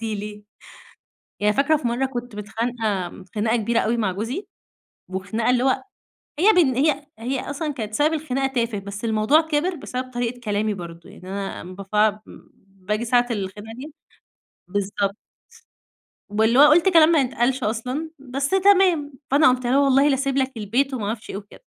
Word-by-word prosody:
هتعدي 225 Hz, -2 st, -3 dB
لي. 210 Hz, 0 st, -7 dB, 1.0 s
يعني 210 Hz, 0 st, +3 dB
فاكرة 285 Hz, +3 st, +3 dB
في 250 Hz, -5 st, -2 dB
مرّة 250 Hz, +3 st, 0 dB
كنت 245 Hz, -3 st, -6 dB
متخانقة 210 Hz, -4 st, -3 dB
خناقة 220 Hz, +2 st, +1 dB
كبيرة 230 Hz, +1 st, +1 dB
أوي 235 Hz, +2 st, 0 dB
مع 210 Hz, -5 st, 0 dB
جوزي، 235 Hz, -, -4 dB, 0.6 s
وخناقة 200 Hz, +5 st, -2 dB
اللي 250 Hz, 0 st, +3 dB
هو 265 Hz, -, +1 dB, 0.6 s
هي 395 Hz, +6 st, +6 dB
بن 305 Hz, -, +4 dB
هي 290 Hz, +1 st, +1 dB
هي 255 Hz, +4 st, -3 dB
أصلًا 295 Hz, +1 st, -3 dB
كانت 220 Hz, -6 st, -6 dB
سبب 300 Hz, +6 st, +2 dB
الخناقة 275 Hz, -4 st, -1 dB
تافه، 230 Hz, -3 st, 0 dB
بس 200 Hz, +2 st, -7 dB
الموضوع 220 Hz, +7 st, +3 dB
كبر 320 Hz, +3 st, -1 dB
بسبب 255 Hz, -4 st, -5 dB
طريقة 245 Hz, 0 st, -3 dB
كلامي 210 Hz, -1 st, -1 dB
برضو، 170 Hz, -2 st, -9 dB
يعني 185 Hz, -, -13 dB
أنا 195 Hz, 0 st, -4 dB
أما 180 Hz, +2 st, -9 dB
بف 210 Hz, +2 st, +1 dB, 0.5 s
باجي 195 Hz, +4 st, -4 dB
ساعة 245 Hz, +1 st, +3 dB
الخناقة 205 Hz, +1 st, -5 dB
دي 290 Hz, +3 st, -9 dB, 0.7 s
بالضبط. 200 Hz, +1 st, -1 dB, 1.1 s
واللي 220 Hz, +4 st, +2 dB
هو 285 Hz, -, +9 dB
قُلت 340 Hz, +4 st, +5 dB
كلام 330 Hz, -4 st, +6 dB
ما 310 Hz, -, +5 dB
يتقالش 255 Hz, +1 st, 0 dB
أصلًا، 250 Hz, +9 st, -2 dB
بس 275 Hz, +1 st, -3 dB
تمام. 375 Hz, -6 st, +4 dB, 0.2 s
فأنا 280 Hz, +1 st, +5 dB
قمت 255 Hz, 0 st, +1 dB
قايلة 250 Hz, +3 st, +3 dB
له 280 Hz, -, +4 dB
والله 275 Hz, +1 st, +4 dB
لاسيب 275 Hz, -1 st, 0 dB
لك 265 Hz, -1 st, +1 dB
البيت، 245 Hz, +6 st, 0 dB
وما 215 Hz, -5 st, -3 dB
اعرفش 220 Hz, +1 st, -5 dB
إيه -, -, -5 dB
وكده. 205 Hz, -, -12 dB
240 Hz, 170 wpm, -23 LUFS, 210-275 Hz, 1.1 s, هو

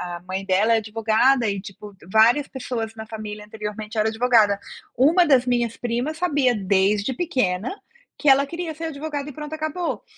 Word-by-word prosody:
a 175 Hz, -, -9 dB
mãe 190 Hz, +1 st, -4 dB
dela 200 Hz, +4 st, +3 dB
é -, -, +4 dB
advogada 225 Hz, +3 st, +2 dB
e 200 Hz, -1 st, -2 dB
tipo, 200 Hz, +1 st, -11 dB, 0.2 s
várias 235 Hz, +7 st, +4 dB
pessoas 240 Hz, -4 st, -5 dB
na 220 Hz, 0 st, -7 dB
família 215 Hz, -1 st, -7 dB
anteriormente 215 Hz, +1 st, -7 dB
era 215 Hz, +1 st, +2 dB
advogada, 220 Hz, -3 st, +3 dB, 0.4 s
uma 320 Hz, +8 st, +4 dB
das 265 Hz, -5 st, +4 dB
minhas 240 Hz, -2 st, 0 dB
primas 245 Hz, +6 st, -2 dB
sabia 290 Hz, -7 st, +2 dB
desde 200 Hz, +2 st, +1 dB
pequena 240 Hz, -, -1 dB, 0.4 s
que 295 Hz, -, +1 dB
ela 275 Hz, +1 st, +5 dB
queria 335 Hz, +2 st, -5 dB
ser 325 Hz, +2 st, -6 dB
advogada 295 Hz, -2 st, -5 dB
e -, -, -9 dB
pronto 300 Hz, +1 st, -7 dB
acabou, 315 Hz, +3 st, -3 dB
235 Hz, 170 wpm, -23 LUFS, 210-285 Hz, 0.4 s, ela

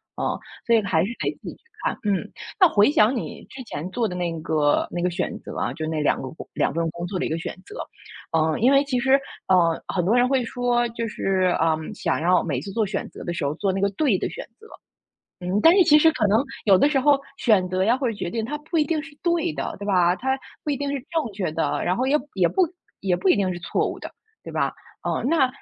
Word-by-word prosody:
嗯。 -, -, -2 dB, 0.3 s
所 235 Hz, -, +4 dB
以 225 Hz, -, +4 dB
还 165 Hz, -5 st, +2 dB
是 200 Hz, -, -2 dB
得 -, -, 0 dB
自 -, -, -7 dB
己 -, -, -9 dB
去 -, -, -30 dB, 0.2 s
看， -, -, -1 dB
嗯。 200 Hz, -3 st, -1 dB, 0.3 s
那 370 Hz, -, +8 dB
回 205 Hz, +2 st, +4 dB
想 230 Hz, -2 st, +4 dB
你 235 Hz, -, -5 dB
之 260 Hz, -, -9 dB
前 175 Hz, -6 st, -6 dB
做 235 Hz, +2 st, 0 dB
的 180 Hz, -, -6 dB
那 175 Hz, -1 st, -1 dB
个 155 Hz, -2 st, +1 dB
那 175 Hz, -, -3 dB
个 180 Hz, -, +1 dB
选 180 Hz, +1 st, -3 dB
择 -, -, -9 dB
啊， -, -, -1 dB
就 160 Hz, -, -4 dB
那 160 Hz, -1 st, -1 dB
2 150 Hz, -, +1 dB
个， 130 Hz, -, -5 dB, 0.2 s
2 -, -, +1 dB
份 165 Hz, 0 st, 0 dB
工 170 Hz, +1 st, -6 dB
作 185 Hz, +1 st, -3 dB
的 -, -, -1 dB
一 -, -, -2 dB
个 160 Hz, -, -1 dB
选 -, -, -5 dB
择。 415 Hz, -, -11 dB, 0.6 s
嗯， 160 Hz, -1 st, +1 dB
因 250 Hz, +4 st, +5 dB
为 275 Hz, 0 st, +5 dB
其 270 Hz, -3 st, -1 dB
实， 265 Hz, +2 st, +4 dB, 0.3 s
呃， 170 Hz, -3 st, +3 dB
很 180 Hz, -2 st, -1 dB
多 215 Hz, +6 st, +3 dB
人 245 Hz, 0 st, +4 dB
会 265 Hz, -2 st, +2 dB
说 240 Hz, 0 st, 0 dB
就 230 Hz, 0 st, -4 dB
是， 190 Hz, -3 st, +1 dB
嗯， 160 Hz, -1 st, 0 dB
想 -, -, -1 dB
要 180 Hz, +2 st, +3 dB
每 140 Hz, -7 st, -2 dB
次 180 Hz, -, -7 dB
做 220 Hz, +1 st, 0 dB
选 195 Hz, 0 st, -4 dB
择 -, -, -10 dB
的 175 Hz, -, -3 dB
时 170 Hz, -, -3 dB
候 145 Hz, +1 st, -1 dB
做 195 Hz, +3 st, 0 dB
那 190 Hz, -, -2 dB
个 200 Hz, -, +3 dB
对 235 Hz, -2 st, +2 dB
的 -, -, -2 dB
选 -, -, -7 dB
择。 440 Hz, -, -15 dB, 0.7 s
嗯， 180 Hz, +3 st, 0 dB
但 330 Hz, -, +8 dB
是 375 Hz, -, +7 dB
其 300 Hz, -2 st, +6 dB
实 320 Hz, +1 st, +6 dB
可 230 Hz, -8 st, +1 dB
能 220 Hz, +6 st, +3 dB, 0.2 s
有 200 Hz, -3 st, +6 dB
的 285 Hz, +10 st, +4 dB
时 285 Hz, -3 st, +2 dB
候 280 Hz, +1 st, +4 dB, 0.2 s
选 200 Hz, -7 st, +3 dB
择 185 Hz, +1 st, 0 dB
呀 225 Hz, +5 st, +3 dB
或 265 Hz, -1 st, -1 dB
者 230 Hz, -, -1 dB
决 175 Hz, -3 st, -4 dB
定 225 Hz, +2 st, -2 dB
它 295 Hz, +7 st, -3 dB
不 310 Hz, +3 st, -8 dB
一 -, -, +5 dB
定 320 Hz, 0 st, -1 dB
是 310 Hz, -2 st, -13 dB
对 340 Hz, -, +1 dB
的， 135 Hz, -2 st, -4 dB
对 200 Hz, -, -7 dB
吧？ 180 Hz, -3 st, +3 dB
它 265 Hz, +6 st, 0 dB, 0.3 s
不 300 Hz, -, -1 dB
一 -, -, 0 dB
定 285 Hz, 0 st, -2 dB
是 -, -, -1 dB, 0.2 s
正 320 Hz, -9 st, -1 dB
确 190 Hz, -5 st, -2 dB
的， 160 Hz, +1 st, -1 dB
然 180 Hz, -, +1 dB
后 255 Hz, +5 st, 0 dB
也 290 Hz, +3 st, +4 dB, 0.2 s
也 185 Hz, -3 st, +3 dB
不 370 Hz, -, +2 dB, 0.3 s
也 190 Hz, -2 st, +1 dB
不 180 Hz, +2 st, 0 dB
一 -, -, +6 dB
定 190 Hz, -2 st, 0 dB
是 175 Hz, -, -7 dB
错 -, -, 0 dB
误 -, -, -6 dB
的， -, -, -7 dB, 0.3 s
对 -, -, -8 dB
吧？ -, -, 0 dB, 0.3 s
嗯， -, -, -1 dB
那 310 Hz, -5 st, +4 dB
200 Hz, 280 characters per minute, -24 LUFS, 175-265 Hz, 0.7 s, 那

